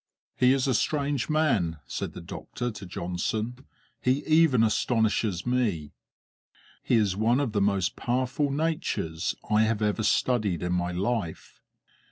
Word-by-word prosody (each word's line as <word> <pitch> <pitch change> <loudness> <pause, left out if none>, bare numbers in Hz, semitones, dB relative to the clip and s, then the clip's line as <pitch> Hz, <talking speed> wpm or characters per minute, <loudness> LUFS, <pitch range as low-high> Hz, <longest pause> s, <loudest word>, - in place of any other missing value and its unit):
"He 125 0 +4
is 135 0 +1
a 130 - +2
strange 140 -1 0
man," 115 - +1
said - - -4
the - - -8
doctor 120 0 -5
to 105 -2 -9
Johnson; 110 +9 -3 0.3
"he 130 +3 +1
even 155 -7 +4
astonishes 110 -4 +1
me. 110 -12 0 0.9
He - - +1
is 105 -5 +2
one 115 +5 +2
of 140 -6 0
the 105 -1 0
most 100 -2 +1
powerful 130 +4 0
natures 140 - -1
I 105 +1 +3
have 110 -1 +1
ever 105 +1 0
studied 105 -5 +1
in 90 0 -1
my 90 0 0
life." 95 -1 -3
110 Hz, 145 wpm, -27 LUFS, 100-130 Hz, 0.9 s, He